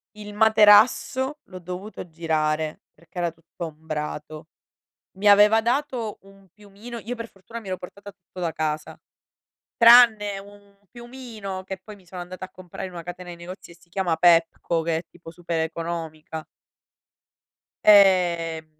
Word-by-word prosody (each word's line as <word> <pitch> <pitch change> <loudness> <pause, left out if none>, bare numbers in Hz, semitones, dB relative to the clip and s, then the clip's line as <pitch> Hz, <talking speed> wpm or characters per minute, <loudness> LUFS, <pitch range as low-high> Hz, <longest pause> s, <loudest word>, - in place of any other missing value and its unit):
Il 210 -1 -9
materasso 220 +6 +4
l'ho 185 -1 -10
dovuto 180 +3 -8
girare 155 -1 -1
perché 170 +3 -19
era 175 -1 0
tutto 165 +1 -9
ombrato. 155 0 -6 0.7
Mi 205 +2 0
aveva 210 +2 +6
dato 240 -2 -2
un 195 0 -19
piumino 210 +4 -11
io 235 +3 -6
per 230 -1 -8
fortuna 210 +5 -10
mi 220 - -13
ero 185 -1 -3
portata 200 +3 -11
tutto 185 -1 -15
da 170 -2 -1
casa, 155 -1 -3 0.8
tranne 230 -4 +6
un 200 0 -17
piumino 235 -6 -8
che 190 0 -6
poi 215 - -11
mi 190 - -22
sono 180 +1 -8
andata 185 +1 -8
a - - -16
comprare 185 0 -8
in 185 - -13
una 170 - -6
catena 180 +1 -8
di 175 - -7
negozi 175 +1 -10
e - - -15
si 170 +1 -25
chiama 175 -2 -1
Pepco, 170 -1 +3
che 165 0 0
è - - -3
tipo 175 -1 -14
super 170 -1 -4
economica. 160 -1 -5 1.4
Ehm, 175 -5 +4
185 Hz, 155 wpm, -24 LUFS, 165-210 Hz, 1.4 s, aveva